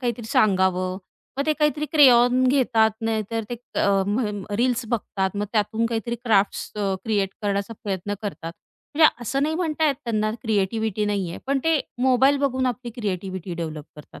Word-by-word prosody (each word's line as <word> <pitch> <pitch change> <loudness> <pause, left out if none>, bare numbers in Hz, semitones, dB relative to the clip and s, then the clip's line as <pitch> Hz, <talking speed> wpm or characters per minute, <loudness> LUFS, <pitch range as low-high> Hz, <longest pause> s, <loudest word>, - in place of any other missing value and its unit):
काहीतरी 240 -2 -3
सांगावं. 185 -3 +2 0.4
मग 280 - 0
ते 310 - +3
काहीतरी 300 0 +1
क्रेयॉन 250 -4 +6
घेतात, 240 -5 +3
नाहीतर 225 0 -2
ते - - -1
क 240 +1 -9
अ, 195 -1 +3
म्ह 210 +3 0 0.3
रील्स 245 +1 +1
बघतात 200 -4 -2
मग 205 - -1
त्यातून 220 +1 +1
काहीतरी 230 0 -2
क्राफ्ट्स 205 -3 +1
अ, 200 -2 0
क्रिएट 205 -4 +1
करण्याचा 200 +2 -1
प्रयत्न 200 0 -3
करतात. 165 -5 -5 0.4
म्हणजे 315 +1 +7
असं 270 +4 -1
नाही 310 +2 0
म्हणता 320 -2 0
येत 285 - +2
त्यांना 215 -2 0
क्रिएटिव्हिटी 215 0 0
नाहीये, 195 -4 -2
पण 275 0 +1
ते 325 -2 +3 0.2
मोबाईल 265 +2 +4
बघून 260 -2 0
आपली 245 0 -3
क्रिएटिव्हिटी 190 -5 -4
डेव्हलप 160 -3 -5
करतात 150 - -13
225 Hz, 165 wpm, -23 LUFS, 200-255 Hz, 0.4 s, म्हणजे